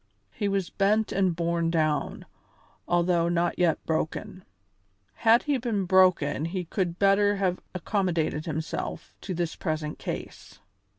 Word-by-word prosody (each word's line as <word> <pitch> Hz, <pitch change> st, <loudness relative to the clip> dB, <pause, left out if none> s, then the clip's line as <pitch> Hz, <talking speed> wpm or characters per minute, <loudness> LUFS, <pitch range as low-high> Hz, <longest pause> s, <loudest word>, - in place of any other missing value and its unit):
He 205 Hz, -, -2 dB
was 195 Hz, -2 st, -1 dB
bent 210 Hz, +2 st, +1 dB
and 190 Hz, -3 st, +1 dB
borne 170 Hz, 0 st, 0 dB
down, 155 Hz, -3 st, 0 dB, 0.6 s
although 175 Hz, -1 st, +2 dB
not 175 Hz, +1 st, 0 dB
yet 170 Hz, -3 st, +1 dB
broken. 170 Hz, +4 st, -3 dB, 0.7 s
Had 230 Hz, +1 st, +4 dB
he 285 Hz, -3 st, 0 dB
been 220 Hz, -5 st, -1 dB
broken 185 Hz, -4 st, +3 dB
he 180 Hz, +1 st, -3 dB
could 175 Hz, 0 st, -2 dB
better 200 Hz, +1 st, +4 dB
have 185 Hz, -2 st, 0 dB, 0.2 s
accommodated 175 Hz, -5 st, -1 dB
himself 160 Hz, 0 st, -4 dB
to 185 Hz, -, -4 dB
his 170 Hz, -1 st, -2 dB
present 155 Hz, -2 st, -3 dB
case. -, -, -7 dB
180 Hz, 130 wpm, -27 LUFS, 165-195 Hz, 0.7 s, Had